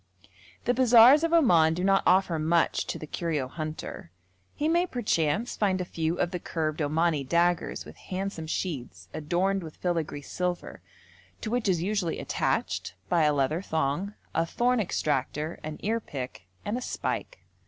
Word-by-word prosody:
The 245 - +3
bazaars 250 +3 +7
of 330 - +1
Oman 170 - +5
do 180 - -2
not 195 0 +4
offer 180 -3 +3
much 165 +2 +1
to - - -3
the - - -7
curio 155 -4 -2
hunter. 155 - -6 0.5
He 300 - 0
may 345 +2 +3
perchance 210 - 0
find 195 -3 +1
a 180 - -2
few 165 0 -2
of 175 - +1
the 180 - -3
curved 160 -2 -2
Omani 155 0 +1
daggers 170 +4 +1
with - - -12
handsome 185 -3 -4
sheaths 125 - -4
adorned 180 +6 0
with 160 -3 -9
filigree 165 -5 -2
silver, 180 +3 -3 0.6
to 220 - -4
which 240 -4 +1
is 175 -3 +1
usually 195 -4 -1
attached, - - -1
by 165 -3 +3
a 150 - +4
leather 145 +4 +1
thong, 160 +4 -1 0.2
a - - +2
thorn 240 +8 +1
extractor, 155 -4 -1
an 155 0 -5
earpick, 135 - -4 0.2
and 220 +4 -1
a - - -9
spike. - - -4
170 Hz, 160 wpm, -28 LUFS, 155-200 Hz, 0.6 s, bazaars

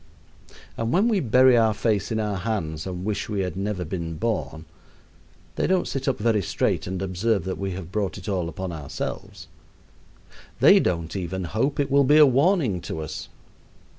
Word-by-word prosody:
And 115 +1 -1
when 195 +6 +3
we 220 -4 +2
bury 130 -1 +5
our 110 -2 +3
face 105 -2 0
in 110 - 0
our 105 -2 -1
hands 90 -6 -3
and 90 0 -5
wish 105 -1 -2
we 105 -2 -1
had 90 -2 -3
never 95 -2 -3
been 80 -1 -4
born, 85 -6 -3 0.9
they - - +1
don't 185 0 +1
sit 135 0 -4
up 135 - +1
very 110 -1 +1
straight 90 - -1
and 95 0 -3
observe 95 +1 0
that 95 +1 -4
we 95 -1 -3
have 90 -1 -7
brought 100 -2 -2
it - - -10
all 90 -5 -1
upon 95 +2 -5
ourselves. 75 -4 -6 1.1
They - - +7
don't 85 -1 -1
even 95 0 -3
hope 115 - -1
it 140 -1 0
will 140 0 +5
be 145 +3 +5
a 155 - +9
warning 135 - +2
to 80 - -5
us. 75 -1 -6
100 Hz, 185 wpm, -24 LUFS, 90-120 Hz, 1.1 s, a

